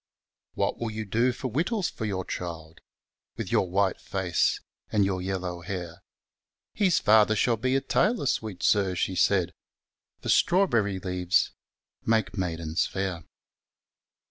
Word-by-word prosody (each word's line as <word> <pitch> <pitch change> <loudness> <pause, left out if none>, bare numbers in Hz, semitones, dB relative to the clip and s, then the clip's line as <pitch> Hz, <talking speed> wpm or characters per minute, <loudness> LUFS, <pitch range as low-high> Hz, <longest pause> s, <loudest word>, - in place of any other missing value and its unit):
What - - -1
will 115 - -2
you 110 0 -5
do 115 +5 +2
for 130 0 -5
whittles 180 - 0
for 110 - -5
your 95 -3 -2
child, 80 -2 -6 0.6
Withyourwhiieface, 95 -1 0 0.3
andy 100 -2 +3
our 95 -1 -2
yellow 90 -2 -3
hair? 90 -1 -6 0.7
His 195 -4 +2
father 110 0 +5
fiall 115 +1 +1
be 130 +1 +1
a 135 - +2
toy 140 - +2
lor, 235 -9 -3
fweet 110 -7 -2
Sir, 95 -3 +3
fie 95 - -1
faid, 90 0 +2 0.7
Forftrawberry 120 - +3
'leaves 90 0 +1 0.5
make 110 -4 +1
maidens 85 -4 -1
fair. 95 -4 -3
100 Hz, 125 wpm, -27 LUFS, 90-115 Hz, 0.7 s, father